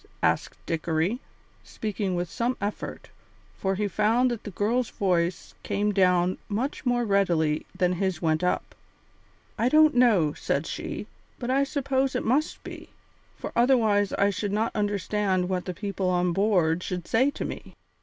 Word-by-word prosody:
asked - - +1
Dickory, 165 +7 0 0.4
speaking 205 -3 -3
with 175 0 -1
some 240 +8 -1
effort, 205 +1 -5 0.4
for 195 0 -1
he 210 +2 0
found 225 +6 +2
that 235 - -4
the - - -4
girl's 220 +6 0
voice 175 -3 -1
came 210 +1 0
down 180 -2 +3
much 250 +6 -2
more 240 -1 +2
readily 170 -7 +1
than 180 -1 +2
his 185 -2 -1
went 160 0 +1
up. 180 - -1 0.9
"I 235 - +3
don't 310 +2 +6
know," 215 -12 +4
said 140 +1 -1
she, - - -5 0.3
"but 245 0 -3
I 275 +1 +3
suppose 270 -1 0
it 250 - -1
must 280 +7 0
be, - - -9 0.5
for - - -6
otherwise 225 -5 +3
I 200 +1 +2
should 200 +1 -3
not 220 +3 -1
understand 205 -2 0
what 180 -1 -2
the 185 - -3
people 200 -2 -2
on 180 -1 +1
board 180 -4 +2
should 180 -2 -4
say 255 +5 +3
to 285 - -5
me. - - -7
205 Hz, 160 wpm, -26 LUFS, 180-235 Hz, 0.9 s, don't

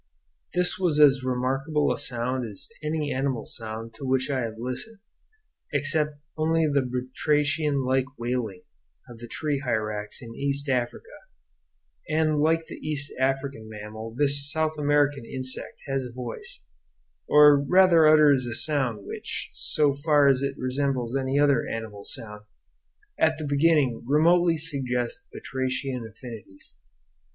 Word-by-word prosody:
This 180 +1 +3
was 170 -5 +1
as 140 -3 +6
remarkable 135 +4 0
a - - -5
sound 125 +1 -2
as 100 - -4
any 150 -1 -2
animal 130 -3 -2
sound 115 0 -5
to 125 - -11
which 130 +1 0
I 135 - 0
have 115 -3 -4
listened, 130 - -5 0.8
except 145 +1 0 0.2
only 160 +1 +1
the 145 -2 +2
batrachian 140 +3 0
like 130 0 +2
wailing 120 -6 -3 0.4
of 120 -2 -12
the 120 - -9
tree 145 +3 -2
hyrax 110 -5 -3
in 115 -2 -9
East 140 +2 -1
Africa; 125 -2 -1 1.0
and 155 -1 +1
like 160 +2 +2
the - - -9
East 145 -2 -3
African 135 -4 -1
mammal 110 +1 -8
this 140 0 +3
South 155 0 0
American 145 -2 +1
insect 130 +2 -4
has 135 -1 -1
a - - -11
voice, 120 -1 -7 0.6
or 150 -1 +7
rather 170 0 +5
utters 150 -4 +5
a 120 - -3
sound 125 -7 +1
which, - - -6
so 145 -2 +3
far 145 0 +3
as 135 -1 +3
it 140 0 -2
resembles 130 -1 -1
any 135 0 0
other 145 -1 +3
animal 105 -3 -6
sound, 110 -7 -4 0.8
at 160 0 +3
the 155 - -5
beginning 145 -4 +2
remotely 165 +4 +4
suggests 135 - -2
batrachian 130 -2 -3
affinities. 110 -4 -12
135 Hz, 140 wpm, -26 LUFS, 125-150 Hz, 1.0 s, or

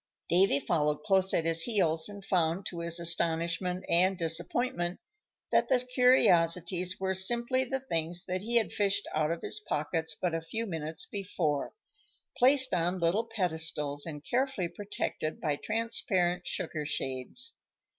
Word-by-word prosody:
Davy 175 -4 +4
followed 150 -2 0
close 190 -2 +3
at 165 - +1
his 165 0 +3
heels, 170 -6 +2
and 200 -1 -10
found, 180 0 0
to 170 - -5
his 170 0 0
astonishment 170 +2 -1
and 185 +3 +3
disappointment, 175 +3 -2 0.5
that - - +2
the 260 - +4
curiosities 185 -8 +3
were 190 0 -1
simply 235 +7 +4
the 265 +1 -3
things 175 -6 -2
that 185 0 -3
he 235 +4 -3
had 230 -2 +2
fished 205 0 0
out 155 0 +1
of 170 0 -4
his - - -2
pockets 160 -3 -2
but 180 -2 -1
a 165 - -1
few 220 +8 -4
minutes 160 -4 -4
before, 175 -8 -3 0.6
placed 260 -1 +6
on 175 +1 +1
little 175 +7 +1
pedestals 160 -8 -2
and 150 -2 -7
carefully 250 -5 -1
protected 195 -6 -4
by 150 -3 -1
transparent 185 -4 -1
sugar 155 -2 -3
shades. 135 - -3
175 Hz, 145 wpm, -30 LUFS, 165-205 Hz, 0.6 s, placed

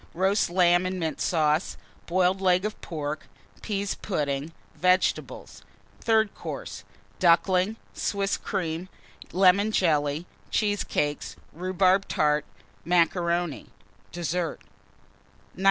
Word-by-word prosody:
Roast 190 +3 +2
Lamb 175 0 +4
and 185 0 -3
Mint 160 -2 -3
Sauce. 155 0 +1 0.3
Boiled 185 +2 +2
Leg 185 0 +3
of 215 - -4
Pork. 150 -2 -5 0.3
Pease 200 -2 -2
Pudding. 145 -5 -2 0.2
Vegetables. 180 +1 0 0.4
THIRD 220 -2 +2
COURSE. - - -7 0.4
Ducklings. 185 +4 +3 0.2
Swiss 200 -1 -1
Cream. 180 -2 -3 0.4
Lemon 195 +3 +4
Jelly. 150 -4 +1 0.2
Cheesecakes. 205 -8 -1 0.2
Rhubarb 185 +2 +2
Tart. 150 0 +1 0.4
Macaroni. 170 -1 +1 0.4
Dessert. 175 0 -2 0.9
1937. - - -16
180 Hz, 95 wpm, -26 LUFS, 165-190 Hz, 0.9 s, Lamb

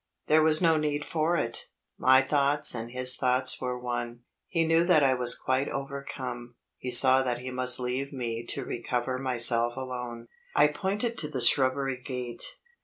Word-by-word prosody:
There 155 +1 +3
was 155 +2 +3
no 165 -1 +3
need 150 -1 -3
for 165 +1 -1
it; 115 -5 -4 0.3
my 130 +1 +4
thoughts 145 +1 +2
and 115 -1 -6
his 125 +1 +4
thoughts 130 0 +1
were 125 -1 -4
one 120 -1 -6 0.3
he 165 -2 -1
knew 165 +1 +2
that 170 -4 +3
I 135 -1 +3
was 125 -1 +1
quite 130 +2 -2
overcome; 135 -3 -7 0.2
he 125 - -6
saw 130 +1 +7
that 125 -2 -2
he 125 +1 -8
must 125 0 +2
leave 130 +2 -4
me 120 -4 -5
to 135 - -2
recover 125 +1 -4
myself 120 -2 +2
alone. 125 -3 -7 0.3
I 145 0 +4
pointed 205 +9 -3
to 150 - -2
the 145 -3 -5
shrubbery 130 +1 +1
gate. 125 -3 -3
130 Hz, 175 wpm, -27 LUFS, 125-145 Hz, 0.3 s, saw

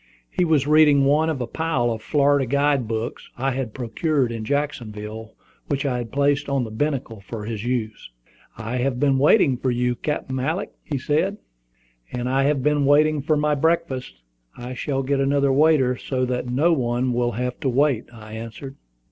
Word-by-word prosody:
He - - +1
was 155 -5 +2
reading 150 -2 +5
one 150 +3 +3
of 145 -5 -2
a - - -1
pile 130 -2 -1
of 110 -1 -4
Florida 140 +1 +2
guide 140 -2 +1
books 110 +1 -4
I 135 +2 0
had 125 -4 -4
procured 135 +1 0
in 115 -1 -5
Jacksonville, 110 -5 -4 0.3
which 140 0 -1
I 125 -3 0
had 115 -2 -6
placed 145 +1 +1
by 140 0 0
the 110 - -6
binnacle 125 -3 -2
for 105 +1 -7
his 110 -1 -4
use. 115 - -3 0.5
"I 115 +2 -4
have 125 0 -1
been 135 -1 +3
waiting 145 - +4
for 130 - -1
you, 125 0 +1
Captain 130 0 -3
Alick," 155 +8 -2 0.3
said 155 +9 0 0.7
he. - - -4
"And 120 0 -2
I 135 +1 +2
have 140 -2 +1
been 150 0 +2
waiting 150 +1 +4
for 155 +2 +1
my 150 0 +1
breakfast. 160 -3 0 0.4
I 125 +1 -6
shall 135 +2 -2
get 140 +1 0
another 140 0 +2
waiter, 140 -3 +4
so 130 0 -2
that 125 0 -3
no 150 +8 +3
one 125 -2 0
will 120 0 0
have 125 +3 -3
to 140 -5 0
wait," 130 -2 +2
I 110 -2 -12
answered. 115 +5 -8
135 Hz, 185 wpm, -23 LUFS, 120-145 Hz, 0.7 s, reading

